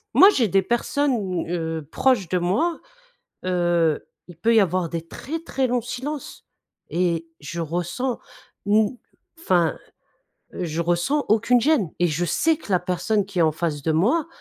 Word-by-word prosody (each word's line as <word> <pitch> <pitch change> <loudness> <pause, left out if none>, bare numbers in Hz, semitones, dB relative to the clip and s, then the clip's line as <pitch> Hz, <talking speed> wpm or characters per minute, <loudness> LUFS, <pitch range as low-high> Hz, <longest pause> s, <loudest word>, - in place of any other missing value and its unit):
Moi, 385 - +9
j'ai 245 - +2
des 195 0 +2
personnes, 235 - 0
heu, 160 -3 -3
proches 245 -10 +2
de 180 - +1
moi, 215 - 0 0.7
heu, 175 -3 +1 0.2
il 175 - -12
peut 225 +8 +2
y 220 - +7
avoir 185 -2 +1
des 165 0 -4
très, 310 - -6
très 270 -5 -1
longs 245 0 0
silences, 260 +5 -6 0.4
et 170 -2 0
je 170 +4 -5
ressens 175 - -2 0.5
une 210 +3 +3 0.4
enfin, 175 - +2 0.8
je 170 -2 -3
ressens 175 - +1
aucune 230 +3 +4
gêne, 260 - +2
et 175 - +3
je 170 +1 -1
sais 315 - +2
que 255 -10 -7
la 180 - +5
personne 190 +3 0
qui 195 -3 -2
est - - +6
en 160 -1 +3
face 155 -2 -3
de 160 - +1
moi 235 - +2
185 Hz, 160 wpm, -23 LUFS, 170-245 Hz, 0.8 s, Moi